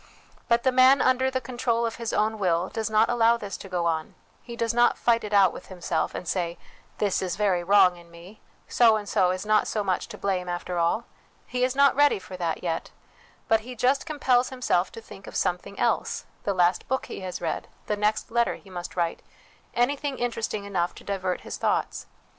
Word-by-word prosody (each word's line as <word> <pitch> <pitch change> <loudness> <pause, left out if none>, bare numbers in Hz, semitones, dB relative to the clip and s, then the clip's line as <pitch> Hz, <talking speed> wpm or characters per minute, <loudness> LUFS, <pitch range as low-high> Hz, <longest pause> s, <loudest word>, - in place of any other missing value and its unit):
But 235 0 +2
the 260 - +3
man 260 +2 +6
under 260 +1 +3
the 260 0 -1
control 240 -1 -1
of 230 - -3
his 230 -1 -3
own 215 +1 0
will 175 -1 +1
does 220 -1 -3
not 215 +1 +4
allow 235 -1 +3
this 205 -4 -6
to 195 - -10
go 175 -2 -1
on: 160 -2 -2 0.3
he 235 - -9
does 230 -1 -1
not 240 0 +3
fight 230 -1 +2
it 210 - -5
out 195 -3 +5
with - - -10
himself, 175 -3 -2
and 180 - -6
say, 175 -2 -2 0.2
' - - -31
This 205 -3 0
is 185 -2 -2
very 195 -4 +1
wrong 190 -1 +5
in 170 0 -16
me. 170 +5 -14 0.3
So 230 -2 +5
and 210 -1 -4
so 185 -2 +2
is 185 +2 -2
not 215 0 +3
so 210 - -1
much 185 -2 -1
to - - -9
blame, 185 -2 -2
after 175 0 -3
all. 170 +8 +1 0.4
He 250 0 -2
is 255 +1 +1
not 280 0 +5
ready 290 -2 +4
for 190 -1 -10
that 170 -2 -3
yet; 165 -2 -2 0.6
but 225 - +4
he 250 +3 -9
just 265 +6 +1
compels 260 -5 +2
himself 250 -8 0
to 230 - -8
think 200 -3 -13
of - - -9
something 180 +3 -2
else - - 0 0.2
the 200 - +1
last 175 0 +2
book 265 -1 -1
he - - -7
has 185 -2 -5
read, 165 -2 -3 0.2
the 210 - -1
next 210 +2 -1
letter 235 0 +1
he 195 - -16
must 175 -1 -7
write, 170 -2 -1 0.5
anything 275 +3 0
interesting 230 -3 -2
enough 180 -3 -1
to - - -12
divert 190 -2 -2
his - - -6
thoughts. - - -1
210 Hz, 215 wpm, -26 LUFS, 180-240 Hz, 0.6 s, man